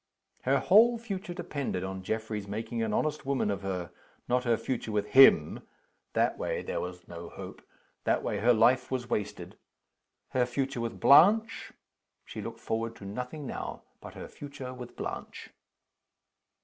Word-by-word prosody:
Her 135 +2 +4
whole 230 +9 +5
future 195 -5 -5
depended 140 - -3
on 95 0 -5
Geoffrey's 110 0 -3
making 115 +3 -3
an 110 -1 0
honest 150 +7 0
woman 135 -6 0
of 100 -1 -3
her. 90 -3 -4 0.4
Not 125 +1 +1
her 115 -2 +3
future 115 -1 -3
with 105 0 -1
him 130 - +6 0.5
that - - +1
way - - -2
there - - -3
was 90 0 -7
no 85 0 -8
hope; - - -9 0.4
that - - +1
way 105 - -1
her 120 +4 +4
life 125 +3 +4
was 125 -2 -3
wasted. 105 -1 -3 0.7
Her 125 -1 +1
future 135 0 -2
with 115 -1 -4
Blanche 210 +10 +5 0.5
she - - -7
looked - - -7
forward 115 0 -2
to 100 - -11
nothing 125 +8 -5
now - - -5 0.2
but - - -10
her - - -7
future 140 -3 -8
with 125 -1 -9
Blanche. - - -6
120 Hz, 160 wpm, -29 LUFS, 105-140 Hz, 0.7 s, him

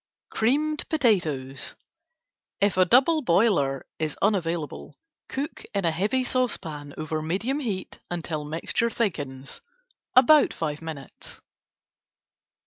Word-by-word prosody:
Creamed 295 +7 +1
Potatoes: 160 - 0 0.8
If 200 -1 +2
a 185 0 +5
double 270 - +5
boiler 170 - +2
is 155 -2 -2
unavailable, 170 -6 -1 0.3
cook 285 +4 -4
in 195 -2 +1
a 165 - +3
heavy 210 +10 +1
saucepan 160 - -2
over 155 0 -3
medium 200 - -1
heat 210 -9 -4
until 165 -3 -3
mixture 165 +9 -1
thickens, 145 - -3 0.5
about 290 +4 +6
5 155 -2 -3
minutes. 155 -5 -9
180 Hz, 105 wpm, -26 LUFS, 155-245 Hz, 0.8 s, about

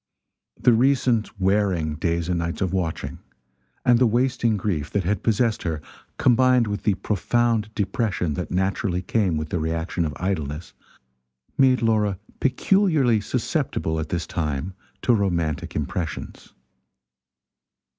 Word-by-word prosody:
The 125 - +5
recent 120 -4 +2
wearing 95 -5 +1
days 85 +1 -1
and 90 -2 0
nights 85 +2 -3
of 95 -1 0
watching, 90 -4 -3 0.7
and 120 -1 +5
the 125 - +5
wasting 120 -1 +1
grief 90 -7 -2
that 100 - -1
had 100 +4 0
possessed 115 0 +1
her, 80 -3 -2 0.4
combined 125 0 +4
with 100 -1 -3
the 105 - +3
profound 115 +1 0
depression 100 - -1
that - - -4
naturally 95 0 -1
came 95 -5 +1
with 75 0 -4
the 85 - -1
reaction 80 +2 -2
of 75 -2 -2
idleness, 80 -4 -3 0.8
made 130 -2 +4
Laura 105 -4 +2 0.2
peculiarly 135 - +2
susceptible 80 -4 -1
at 80 -1 -4
this 85 -2 -2
time 75 +2 -3 0.3
to 120 - +4
romantic 85 -8 -1
impressions. 80 +3 -4
100 Hz, 130 wpm, -24 LUFS, 85-115 Hz, 0.8 s, The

